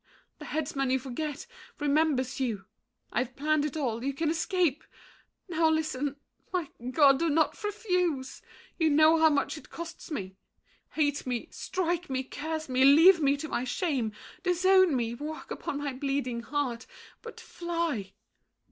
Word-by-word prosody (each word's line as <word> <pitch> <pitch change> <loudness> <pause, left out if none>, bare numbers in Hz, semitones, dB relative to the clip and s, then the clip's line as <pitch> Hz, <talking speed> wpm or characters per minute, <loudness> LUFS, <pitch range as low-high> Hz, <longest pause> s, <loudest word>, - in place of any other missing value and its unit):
The - - -8
headsman 280 -3 -2
you 260 - +3
forget, 280 - -5 0.3
remembers 290 -3 +1
you. 225 -7 -2 0.5
I've 245 +2 -1
planned 300 +1 +1
it 300 0 -3
all. 240 -5 -2
You 275 +1 -1
can 315 +2 0
escape. 335 -3 0 0.6
Now, 325 -2 +2
listen— 295 -3 -1 0.4
My 355 -6 -1 0.2
God! 275 0 +5
do 335 - +1
not 315 +6 +1
refuse. 360 - -1 0.4
You 320 -1 +4
know 310 +2 +5
how 320 0 +6
much 290 +1 0
It - - -18
costs 335 0 -8
me. 190 - -5 0.6
Hate 290 -3 0
me, 245 -2 -3
strike 350 -2 -2
me, 260 0 -1
curse 315 +4 -5
me, 260 0 +2
leave 325 +6 +7
Me 280 0 +3
to 315 - -5
my 245 - -2
shame, 255 - -1 0.3
disown 375 -2 +4
me, 235 -2 -1
walk 300 +5 -7
upon 280 - -4
My 285 -1 -3
bleeding 265 -3 -2
heart—but 275 - -6
fly! 335 - -3
295 Hz, 145 wpm, -29 LUFS, 260-325 Hz, 0.6 s, leave